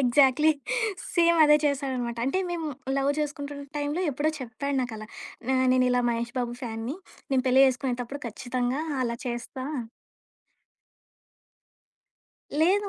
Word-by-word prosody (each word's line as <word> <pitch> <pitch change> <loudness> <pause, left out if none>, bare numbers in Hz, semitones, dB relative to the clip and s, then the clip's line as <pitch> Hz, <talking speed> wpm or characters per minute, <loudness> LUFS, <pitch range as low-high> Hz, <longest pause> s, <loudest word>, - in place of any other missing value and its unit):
Exactly. 270 +4 +5 0.6
Same 340 -1 +5
అదే 300 0 +7
చేశాడనమాట. 260 -4 -1
అంటే 275 +8 +1
మేము 330 -3 -2 0.3
లవ్ 275 +1 +2
చేసుకుంటున్న 285 -1 -4
టైంలో 295 +3 -1
ఎప్పుడో 290 +3 0
చెప్పాడు 255 +3 -3
నాకలా. 220 -4 -4 0.5
ఆహ్, 260 0 +3
నేనిలా 250 -1 +3
మహేష్ 235 +1 -2
బాబు 240 -1 -2
ఫ్యాన్‌ని. 230 +4 -4 0.3
నేను 265 -1 +2
పెళ్లి 260 +1 +6
చేసుకునేతప్పుడు 250 +1 -3
ఖచ్చితంగా 250 +4 -2 0.2
అలా 235 -1 -1
చేస్తా 240 +2 -4 3.0
లేదు. 395 +5 +3
260 Hz, 110 wpm, -27 LUFS, 245-290 Hz, 3.0 s, అదే